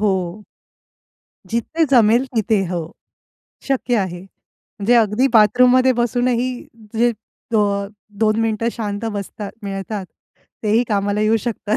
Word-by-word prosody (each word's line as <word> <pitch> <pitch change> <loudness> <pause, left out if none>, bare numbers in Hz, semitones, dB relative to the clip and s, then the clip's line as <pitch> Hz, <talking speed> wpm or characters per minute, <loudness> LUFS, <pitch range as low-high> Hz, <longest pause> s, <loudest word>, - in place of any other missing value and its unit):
हो. 190 -1 -1 1.1
जिथे 275 +8 0
जमेल 240 0 +4
तिथे. 215 -2 +2
हो. 170 -2 -4 0.8
शक्य 255 -3 +1
आहे. 180 -3 -3
म्हणजे 200 +3 -4
अगदी 230 +2 +3
बाथरूममध्ये 250 +4 +5
बसूनही 245 +1 0 0.4
जे 235 +2 +3 0.4
अ, 200 -2 +1 0.3
2 215 0 +2
मिनिटं 225 0 0
शांत 210 -2 -4
बसतात 200 0 -6
मिळतात. 195 0 -5 0.6
तेही 220 +2 +3
कामाला 205 -1 0
येऊ 215 +1 +3
शकतात. 215 -1 -1
215 Hz, 110 wpm, -19 LUFS, 200-240 Hz, 1.1 s, बाथरूममध्ये